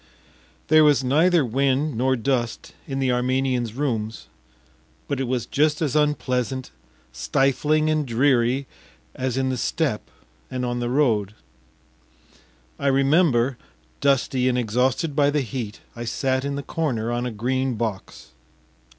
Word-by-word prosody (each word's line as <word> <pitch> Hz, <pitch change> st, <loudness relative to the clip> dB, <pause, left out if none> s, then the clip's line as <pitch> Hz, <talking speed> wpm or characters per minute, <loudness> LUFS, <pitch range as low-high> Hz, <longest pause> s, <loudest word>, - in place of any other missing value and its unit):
There 155 Hz, 0 st, +6 dB
was 145 Hz, -3 st, +4 dB
neither 160 Hz, +4 st, +3 dB
wind 135 Hz, +4 st, 0 dB
nor 130 Hz, +3 st, +2 dB
dust 120 Hz, -2 st, -2 dB
in 135 Hz, -, -3 dB
the 135 Hz, -2 st, +1 dB
Armenian’s 125 Hz, -2 st, 0 dB
rooms, 115 Hz, -6 st, -2 dB, 0.8 s
but 140 Hz, -, -2 dB
it 135 Hz, -, 0 dB
was 125 Hz, -1 st, -1 dB
just 150 Hz, +1 st, +1 dB
as 155 Hz, -4 st, -1 dB
unpleasant, 130 Hz, -4 st, 0 dB, 0.4 s
stifling, 140 Hz, -, +1 dB
and 155 Hz, -1 st, +1 dB
dreary 130 Hz, +1 st, +2 dB, 0.5 s
as 130 Hz, -1 st, -2 dB
in 130 Hz, 0 st, +1 dB
the 130 Hz, -, -2 dB
steppe -, -, -1 dB, 0.4 s
and 125 Hz, -1 st, -3 dB
on 120 Hz, 0 st, -2 dB
the 120 Hz, 0 st, -2 dB
road. 110 Hz, -7 st, +1 dB, 1.4 s
I 140 Hz, -, -1 dB
remember, 135 Hz, -2 st, +3 dB, 0.4 s
dusty 130 Hz, -2 st, +2 dB
and 125 Hz, -, 0 dB
exhausted 125 Hz, +6 st, 0 dB
by 145 Hz, -1 st, +4 dB
the 145 Hz, 0 st, +1 dB
heat, 115 Hz, -3 st, -5 dB
I 120 Hz, 0 st, -6 dB
sat 130 Hz, +2 st, -1 dB
in 140 Hz, 0 st, -2 dB
the 140 Hz, -, -4 dB
corner 125 Hz, -10 st, -2 dB
on 120 Hz, +1 st, -1 dB
a -, -, -4 dB
green 130 Hz, +3 st, -1 dB
box. 110 Hz, -3 st, -5 dB
130 Hz, 140 wpm, -23 LUFS, 120-140 Hz, 1.4 s, There